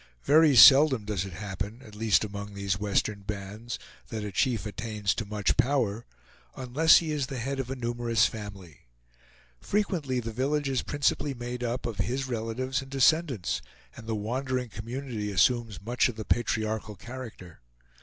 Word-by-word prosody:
Very 155 Hz, -1 st, +5 dB
seldom 135 Hz, -2 st, +8 dB
does 100 Hz, -3 st, -2 dB
it 95 Hz, -, -8 dB
happen, 100 Hz, +5 st, -6 dB
at 110 Hz, -4 st, -14 dB
least 110 Hz, -1 st, +2 dB
among 100 Hz, -1 st, -6 dB
these 100 Hz, -1 st, -1 dB
western 100 Hz, 0 st, 0 dB
bands, 105 Hz, +3 st, -6 dB, 0.3 s
that 110 Hz, -2 st, -5 dB
a 105 Hz, -, -4 dB
chief 115 Hz, +5 st, 0 dB
attains 105 Hz, -1 st, -2 dB
to 110 Hz, -, -4 dB
much 105 Hz, -1 st, 0 dB
power, 125 Hz, -4 st, +1 dB, 0.5 s
unless 140 Hz, +6 st, +5 dB
he 160 Hz, -2 st, -1 dB
is 145 Hz, -4 st, -1 dB
the 135 Hz, -2 st, -5 dB
head 135 Hz, +3 st, -3 dB
of 130 Hz, -2 st, -3 dB
a 135 Hz, -, -3 dB
numerous 120 Hz, -3 st, +1 dB
family. 100 Hz, -, -7 dB, 0.7 s
Frequently 170 Hz, -11 st, -1 dB
the 115 Hz, -1 st, -4 dB
village 140 Hz, +4 st, 0 dB
is 130 Hz, -2 st, 0 dB
principally 145 Hz, -1 st, 0 dB
made 120 Hz, 0 st, -5 dB
up 120 Hz, +1 st, -2 dB
of 115 Hz, -4 st, -4 dB
his 125 Hz, +7 st, -1 dB
relatives 125 Hz, +3 st, -2 dB
and 135 Hz, -, -11 dB
descendants, 135 Hz, -, +2 dB, 0.3 s
and 115 Hz, -, -11 dB
the 110 Hz, -, -1 dB
wandering 125 Hz, +3 st, -2 dB
community 115 Hz, -1 st, -5 dB
assumes 115 Hz, +1 st, +2 dB
much 120 Hz, +5 st, +1 dB
of 120 Hz, -, -6 dB
the 110 Hz, -1 st, -6 dB
patriarchal 110 Hz, -2 st, -1 dB
character. 115 Hz, -6 st, -10 dB
115 Hz, 165 wpm, -28 LUFS, 105-130 Hz, 0.7 s, seldom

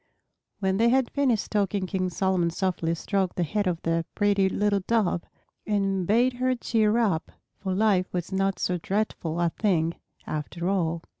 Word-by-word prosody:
When 190 Hz, -1 st, 0 dB
they 230 Hz, +2 st, +4 dB
had 260 Hz, 0 st, +2 dB
finished 260 Hz, -7 st, +1 dB
talking 200 Hz, -2 st, 0 dB
King 185 Hz, -1 st, -1 dB
Solomon 185 Hz, -1 st, +1 dB
softly 170 Hz, -2 st, -1 dB
stroked 190 Hz, +1 st, -1 dB
the 175 Hz, -, 0 dB
head 205 Hz, +5 st, -1 dB
of 170 Hz, -2 st, -2 dB
the 165 Hz, 0 st, +1 dB
pretty 200 Hz, -2 st, +3 dB
little 205 Hz, +1 st, +1 dB
Dove 210 Hz, -7 st, +2 dB, 0.5 s
and 195 Hz, -3 st, 0 dB
bade 240 Hz, +4 st, +3 dB
her 255 Hz, +1 st, 0 dB
cheer 220 Hz, -2 st, +1 dB
up, 195 Hz, -9 st, 0 dB, 0.3 s
for 190 Hz, -2 st, -2 dB
life 195 Hz, -3 st, +2 dB
was 180 Hz, 0 st, -3 dB
not 195 Hz, 0 st, 0 dB
so 180 Hz, -1 st, -1 dB
dreadful 180 Hz, -4 st, -2 dB
a 170 Hz, -1 st, +2 dB
thing, 170 Hz, -6 st, +1 dB, 0.3 s
after 170 Hz, +3 st, -4 dB
all. 170 Hz, -4 st, 0 dB
195 Hz, 165 wpm, -26 LUFS, 175-210 Hz, 0.5 s, they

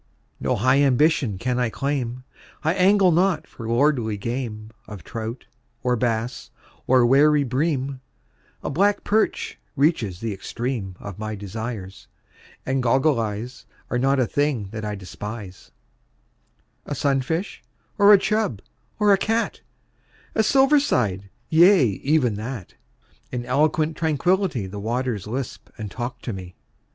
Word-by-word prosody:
No -, -, 0 dB
high 130 Hz, +5 st, +3 dB
ambition 135 Hz, -, +3 dB
can 125 Hz, +5 st, -1 dB
I 120 Hz, -2 st, +1 dB
claim 130 Hz, -1 st, -3 dB, 0.4 s
I 160 Hz, +2 st, +2 dB
angle 190 Hz, 0 st, +4 dB
not 175 Hz, -1 st, +2 dB
for 115 Hz, -, -9 dB
lordly 120 Hz, -3 st, +2 dB
game 110 Hz, -1 st, -4 dB, 0.2 s
Of 105 Hz, -5 st, -9 dB
trout, 115 Hz, +1 st, -6 dB, 0.4 s
or 125 Hz, -1 st, +2 dB
bass, 115 Hz, 0 st, -2 dB, 0.4 s
or 130 Hz, -1 st, +5 dB
wary 145 Hz, +3 st, +5 dB
bream 135 Hz, 0 st, -1 dB, 0.6 s
A -, -, -2 dB
black 200 Hz, +7 st, +2 dB
perch 215 Hz, +1 st, 0 dB, 0.2 s
reaches 135 Hz, -, +1 dB
the 115 Hz, -2 st, -3 dB
extreme 110 Hz, -1 st, -4 dB
Of 100 Hz, -2 st, -8 dB
my 110 Hz, 0 st, -4 dB
desires; 105 Hz, -1 st, -6 dB, 0.6 s
and 135 Hz, 0 st, 0 dB
"goggle 130 Hz, +2 st, +3 dB
eyes" 115 Hz, +3 st, -5 dB, 0.2 s
Are 125 Hz, -, +1 dB
not 135 Hz, +2 st, +2 dB
a 130 Hz, -, +3 dB
thing 135 Hz, -6 st, -1 dB
that 110 Hz, -1 st, -6 dB
I 105 Hz, -1 st, -3 dB
despise; 100 Hz, 0 st, -8 dB, 1.2 s
A -, -, -3 dB
sunfish, 140 Hz, +7 st, -1 dB, 0.4 s
or 200 Hz, +1 st, +8 dB
a 205 Hz, -, +10 dB
"chub," 195 Hz, -, -1 dB, 0.3 s
or 210 Hz, -2 st, +5 dB
a 195 Hz, -, +3 dB
"cat" 225 Hz, +3 st, -1 dB, 0.7 s
A -, -, +3 dB
"silver 270 Hz, +6 st, +5 dB
side" 100 Hz, -, 0 dB, 0.2 s
yea, 175 Hz, +2 st, +6 dB
even 125 Hz, +4 st, +1 dB
that! 110 Hz, -2 st, -6 dB, 0.6 s
In 120 Hz, -1 st, -4 dB
eloquent 155 Hz, +3 st, +1 dB
tranquility 165 Hz, -, +1 dB
The 100 Hz, +2 st, -7 dB
waters 115 Hz, -1 st, -2 dB
lisp 125 Hz, +3 st, -5 dB
and 105 Hz, -2 st, -6 dB
talk 120 Hz, +2 st, -5 dB
to 120 Hz, -, -3 dB
me. 90 Hz, -2 st, -8 dB
125 Hz, 140 wpm, -23 LUFS, 110-155 Hz, 1.2 s, a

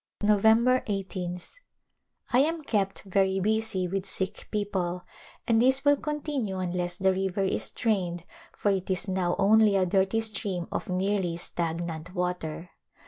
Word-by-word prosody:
November 220 Hz, +5 st, +4 dB
1 200 Hz, -2 st, -1 dB
8th. 180 Hz, -2 st, -6 dB, 0.8 s
I 245 Hz, -, +6 dB
am 315 Hz, +3 st, +1 dB
kept 200 Hz, -7 st, -1 dB
very 195 Hz, 0 st, +1 dB
busy 215 Hz, -2 st, 0 dB
with 195 Hz, +1 st, -3 dB
sick 190 Hz, 0 st, -4 dB
people 185 Hz, -4 st, -2 dB, 0.4 s
and 230 Hz, -1 st, +4 dB
this 265 Hz, +3 st, +4 dB
will 285 Hz, 0 st, +6 dB
continue 290 Hz, -9 st, -3 dB
unless 175 Hz, -1 st, -2 dB
the 190 Hz, 0 st, +3 dB
river 190 Hz, +1 st, -1 dB
is 190 Hz, -, 0 dB
drained 180 Hz, -7 st, -1 dB, 0.3 s
for 205 Hz, -, +1 dB
it 190 Hz, -1 st, -2 dB
is 185 Hz, +2 st, 0 dB
now 185 Hz, -2 st, 0 dB
only 210 Hz, +1 st, +5 dB
a 190 Hz, -1 st, +3 dB
dirty 195 Hz, +4 st, +1 dB
stream 200 Hz, -5 st, -2 dB
of -, -, -4 dB
nearly 185 Hz, -2 st, 0 dB
stagnant 170 Hz, 0 st, -4 dB
water. 180 Hz, -2 st, -3 dB
195 Hz, 145 wpm, -27 LUFS, 180-215 Hz, 0.8 s, I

